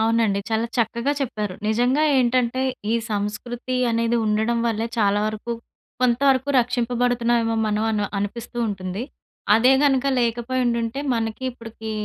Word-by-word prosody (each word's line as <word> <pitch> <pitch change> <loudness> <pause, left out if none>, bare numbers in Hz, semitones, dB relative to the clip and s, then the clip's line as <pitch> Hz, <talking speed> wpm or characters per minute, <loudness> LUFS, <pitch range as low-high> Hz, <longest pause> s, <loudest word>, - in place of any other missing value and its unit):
అవునండి. 220 -3 +2
చాలా 225 +1 +1
చక్కగా 235 +4 0
చెప్పారు. 210 -7 -3
నిజంగా 245 +6 +2 0.2
ఏంటంటే 250 +1 +1 0.3
ఈ - - +2 0.2
సంస్కృతి 240 +5 -3
అనేది 230 +1 +1
ఉండడం 220 +2 +1
వల్లే 225 0 0
చాలా 205 -1 +3
వరకు 215 +2 -4 0.5
కొంతవరకు 260 +2 +3
రక్షింపబడుతున్నామో 240 -1 +1
మనం 215 0 0
అను 210 -1 0
అనిపిస్తూ 235 +4 -5
ఉంటుంది. 190 +1 -4 0.5
అదే 245 +4 +5
గనక 275 -1 +3
లేకపోయుండుంటే 240 +1 -1
మనకి 225 +1 -3
ఇప్పటికి 225 -2 -9
235 Hz, 120 wpm, -23 LUFS, 220-245 Hz, 0.5 s, అదే